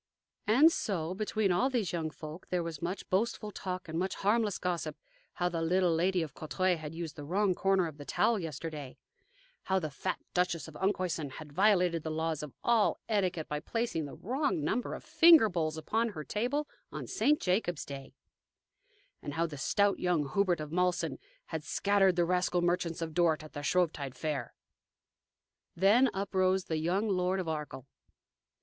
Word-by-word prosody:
And 275 Hz, +10 st, +7 dB
so, 180 Hz, -, -2 dB
between 210 Hz, 0 st, 0 dB
all 180 Hz, +10 st, +2 dB
these 235 Hz, -9 st, -1 dB
young 160 Hz, -2 st, -1 dB
folk, 155 Hz, +2 st, -9 dB
there 180 Hz, -1 st, 0 dB
was 165 Hz, -3 st, -6 dB
much 175 Hz, +3 st, -4 dB
boastful 210 Hz, +2 st, 0 dB
talk 185 Hz, -2 st, -5 dB
and 160 Hz, +1 st, -3 dB
much 190 Hz, +1 st, -1 dB
harmless 210 Hz, 0 st, +1 dB
gossip 180 Hz, -2 st, -2 dB, 0.4 s
how 175 Hz, -, 0 dB
the 170 Hz, -2 st, -2 dB
little 175 Hz, +1 st, +2 dB
Lady 180 Hz, +2 st, +2 dB
of 155 Hz, -, -7 dB
Courtrai 185 Hz, +4 st, 0 dB
had 155 Hz, -1 st, -7 dB
used 165 Hz, -2 st, -5 dB
the 145 Hz, -, -8 dB
wrong 190 Hz, +5 st, +1 dB
corner 195 Hz, 0 st, +2 dB
of 155 Hz, -3 st, -7 dB
the -, -, -6 dB
towel 225 Hz, +9 st, +2 dB
yesterday; 155 Hz, -4 st, -6 dB, 0.7 s
how 190 Hz, -, +2 dB
the 155 Hz, -5 st, -2 dB
fat 185 Hz, +6 st, -2 dB, 0.2 s
Duchess 175 Hz, -3 st, 0 dB
of 160 Hz, -, -11 dB
Enkhuysen 175 Hz, -5 st, -1 dB
had 150 Hz, 0 st, -10 dB
violated 180 Hz, -3 st, +3 dB
the 160 Hz, -, -4 dB
laws 160 Hz, -1 st, -1 dB
of 150 Hz, -2 st, -7 dB
all 235 Hz, -3 st, +3 dB
etiquette 185 Hz, -7 st, 0 dB
by 150 Hz, -, -2 dB
placing 195 Hz, -2 st, -2 dB
the 140 Hz, -, -8 dB
wrong 260 Hz, -, -1 dB
number 225 Hz, +11 st, -1 dB
of -, -, -9 dB
finger 325 Hz, -9 st, +7 dB
bowls 160 Hz, -3 st, -1 dB
upon 225 Hz, +9 st, 0 dB
her 160 Hz, -8 st, -6 dB
table 250 Hz, -, -1 dB, 0.2 s
on -, -, -5 dB
St. 285 Hz, +8 st, +2 dB
Jacob's 180 Hz, -3 st, 0 dB
Day; 135 Hz, -1 st, -9 dB, 1.1 s
and 145 Hz, -, -6 dB
how 165 Hz, +1 st, +1 dB
the 160 Hz, -3 st, -6 dB
stout 200 Hz, +8 st, +1 dB
young 160 Hz, -6 st, 0 dB
Hubert 185 Hz, -2 st, +2 dB
of 155 Hz, -1 st, -6 dB
Malsen 180 Hz, -3 st, 0 dB, 0.3 s
had 160 Hz, -1 st, -2 dB
scattered 195 Hz, +4 st, +2 dB
the 175 Hz, -1 st, +3 dB
rascal 180 Hz, 0 st, +1 dB
merchants 175 Hz, -1 st, 0 dB
of 160 Hz, -1 st, -5 dB
Dort 160 Hz, -2 st, +2 dB
at 155 Hz, -, -12 dB
their 145 Hz, -, -5 dB
Shrovetide 150 Hz, -5 st, 0 dB
fair. 155 Hz, -3 st, -3 dB, 1.2 s
Then 210 Hz, +9 st, +5 dB
uprose 190 Hz, -1 st, +1 dB
the 160 Hz, -, -2 dB
young 180 Hz, +7 st, 0 dB
Lord 185 Hz, -1 st, +1 dB
of 180 Hz, -, -3 dB
Arkell. 150 Hz, -5 st, -4 dB
180 Hz, 180 wpm, -31 LUFS, 160-195 Hz, 1.2 s, And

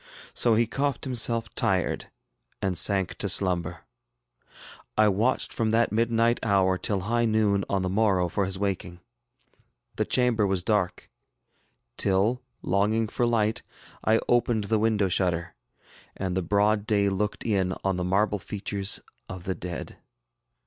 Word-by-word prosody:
So 115 Hz, -2 st, +3 dB
he 115 Hz, +2 st, +3 dB
coughed 135 Hz, +3 st, -2 dB
himself 115 Hz, -3 st, +1 dB
tired, 95 Hz, -2 st, -1 dB, 0.5 s
and 95 Hz, -2 st, -1 dB
sank 95 Hz, +1 st, +2 dB
to 100 Hz, -, 0 dB
slumber. 90 Hz, -3 st, +2 dB, 1.1 s
I 110 Hz, 0 st, +5 dB
watched 110 Hz, +6 st, 0 dB
from 115 Hz, -2 st, 0 dB
that 115 Hz, +1 st, +2 dB
midnight 115 Hz, +1 st, +1 dB
hour 95 Hz, -3 st, +2 dB
till 100 Hz, -3 st, -1 dB
high 120 Hz, +4 st, 0 dB
noon 105 Hz, -3 st, +2 dB
on 95 Hz, -1 st, 0 dB
the -, -, -1 dB
morrow 95 Hz, -3 st, +2 dB
for 100 Hz, +3 st, -1 dB
his 95 Hz, 0 st, -2 dB
waking. 95 Hz, -3 st, -3 dB, 1.0 s
The -, -, +1 dB
chamber 120 Hz, -5 st, +2 dB
was 95 Hz, -2 st, 0 dB
dark; 105 Hz, -3 st, -1 dB, 0.9 s
till, 100 Hz, +6 st, +1 dB, 0.2 s
longing 105 Hz, +4 st, +1 dB
for 120 Hz, -, 0 dB
light, 110 Hz, -2 st, +1 dB, 0.4 s
I 110 Hz, +1 st, +3 dB
opened 120 Hz, -2 st, +2 dB
the 110 Hz, +2 st, 0 dB
window 105 Hz, -2 st, +2 dB
shutter, 85 Hz, -2 st, -1 dB, 0.6 s
and 95 Hz, -2 st, -3 dB
the 95 Hz, -, 0 dB
broad 105 Hz, +4 st, +1 dB
day 100 Hz, -2 st, +2 dB
looked 100 Hz, +2 st, -2 dB
in 95 Hz, -4 st, 0 dB
on 95 Hz, -2 st, 0 dB
the 90 Hz, -, -2 dB
marble 100 Hz, +3 st, +1 dB
features 100 Hz, 0 st, -2 dB, 0.3 s
of 95 Hz, -2 st, -7 dB
the 95 Hz, 0 st, -2 dB
dead. 90 Hz, -2 st, -7 dB
100 Hz, 145 wpm, -26 LUFS, 95-110 Hz, 1.1 s, I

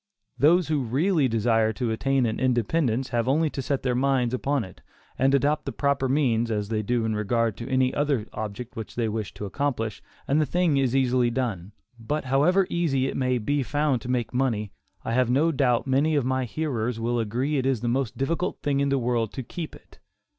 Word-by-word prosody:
Those 165 Hz, +3 st, +4 dB
who 155 Hz, -2 st, +1 dB
really 145 Hz, -, +1 dB
desire 115 Hz, -1 st, +2 dB
to 115 Hz, +2 st, -2 dB
attain 135 Hz, +3 st, +1 dB
an 110 Hz, -1 st, -2 dB
independence, 130 Hz, +1 st, +1 dB
have 120 Hz, -1 st, 0 dB
only 155 Hz, +3 st, +2 dB
to 135 Hz, -, -4 dB
set 140 Hz, +1 st, -2 dB
their 125 Hz, -1 st, +1 dB
minds 130 Hz, -1 st, +1 dB
upon 135 Hz, 0 st, 0 dB
it, 95 Hz, -, -12 dB, 0.3 s
and 135 Hz, +1 st, +3 dB
adopt 145 Hz, +2 st, +1 dB
the -, -, -3 dB
proper 140 Hz, -2 st, 0 dB
means, 120 Hz, -5 st, +2 dB
as 105 Hz, -2 st, -2 dB
they 110 Hz, -1 st, 0 dB
do 115 Hz, +2 st, 0 dB
in 110 Hz, -1 st, -1 dB
regard 110 Hz, +1 st, 0 dB
to 120 Hz, +2 st, -7 dB
any 130 Hz, -1 st, +2 dB
other 140 Hz, -6 st, 0 dB
object 110 Hz, +3 st, -6 dB
which 110 Hz, -2 st, -7 dB
they 115 Hz, -2 st, 0 dB
wish 110 Hz, -1 st, -3 dB
to 105 Hz, -, -5 dB
accomplish, 115 Hz, -2 st, -2 dB, 0.3 s
and 145 Hz, +3 st, +3 dB
the -, -, +2 dB
thing 175 Hz, -5 st, +2 dB
is 135 Hz, -2 st, +1 dB
easily 125 Hz, -2 st, +2 dB
done. 115 Hz, -7 st, -3 dB, 0.3 s
But 145 Hz, +6 st, -3 dB
however 155 Hz, +9 st, +3 dB
easy 150 Hz, -7 st, +1 dB
it -, -, -3 dB
may 125 Hz, -1 st, +1 dB
be 140 Hz, +6 st, 0 dB
found 145 Hz, -2 st, 0 dB
to 125 Hz, -, -7 dB
make 125 Hz, -2 st, -1 dB
money, 115 Hz, -6 st, 0 dB, 0.3 s
I 115 Hz, -, -1 dB
have 125 Hz, 0 st, +2 dB
no 145 Hz, +7 st, +3 dB
doubt 130 Hz, -5 st, +1 dB
many 140 Hz, +4 st, +2 dB
of 140 Hz, -4 st, +1 dB
my 130 Hz, 0 st, 0 dB
hearers 125 Hz, -4 st, -2 dB
will 120 Hz, +1 st, 0 dB
agree 125 Hz, +7 st, -1 dB
it 130 Hz, 0 st, 0 dB
is 130 Hz, -5 st, 0 dB
the 120 Hz, -, -2 dB
most 125 Hz, -1 st, -1 dB
difficult 165 Hz, +6 st, -1 dB
thing 140 Hz, -1 st, +1 dB
in 140 Hz, 0 st, +1 dB
the 140 Hz, -, +2 dB
world 120 Hz, -3 st, 0 dB
to 130 Hz, -, -5 dB
keep 160 Hz, +6 st, -7 dB
it. -, -, -19 dB
130 Hz, 215 wpm, -25 LUFS, 115-140 Hz, 0.3 s, Those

